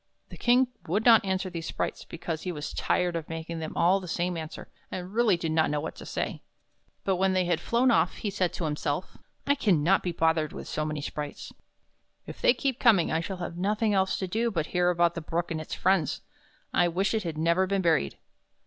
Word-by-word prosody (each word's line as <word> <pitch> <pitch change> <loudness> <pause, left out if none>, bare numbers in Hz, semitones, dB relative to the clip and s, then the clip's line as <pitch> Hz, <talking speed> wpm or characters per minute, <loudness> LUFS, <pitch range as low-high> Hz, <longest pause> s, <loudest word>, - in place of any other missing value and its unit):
The - - -9
King 250 +1 +4 0.2
would 205 +7 0
not 230 -3 +7
answer 190 0 -1
these 165 -2 -5
sprites, - - -3
because 165 -1 -5
he 180 - -3
was 150 -3 -5
tired 180 -1 0
of 165 -2 -4
making 165 0 -5
them 160 -1 -5
all 180 +3 +4
the 185 - -9
same 175 +1 -1
answer, 160 -1 -7 0.2
and 185 +1 -6
really 225 -5 +3
did 165 -1 -2
not 160 0 +2
know 150 0 0
what 160 - -5
to - - -9
say. - - -3 0.6
But 190 -2 +1
when 190 +1 +2
they 185 -1 +2
had 175 -2 0
flown 245 +2 +2
off, 175 -5 +2
he 205 - -3
said 185 -2 0
to - - -4
himself: 150 +2 -3
" - - -43
I 285 - +4
can 200 - +2
not 190 +5 +4
be 180 - -2
bothered 160 -2 +1
with - - -7
so 155 - -2
many 155 -1 -3
sprites. 145 0 -6 0.7
If - - -9
they 245 - +5
keep 265 0 -1
coming 210 -9 +4
I 160 - +1
shall 190 +3 -4
have 175 -1 -5
nothing 210 +3 +1
else 190 -1 +2
to 190 - -3
do 225 +6 0
but 165 -8 -1
hear 180 0 +3
about 170 -1 +3
the 165 - -5
Brook 165 +2 -2
and 160 -1 -2
its 155 - -6
friends. 185 -7 +1 0.5
I 175 - +4
wish 190 +5 0
it 220 - +1
had 165 -5 -4
never 170 +4 +2
been 195 0 0
buried." 160 - +2
175 Hz, 230 wpm, -28 LUFS, 160-195 Hz, 0.7 s, not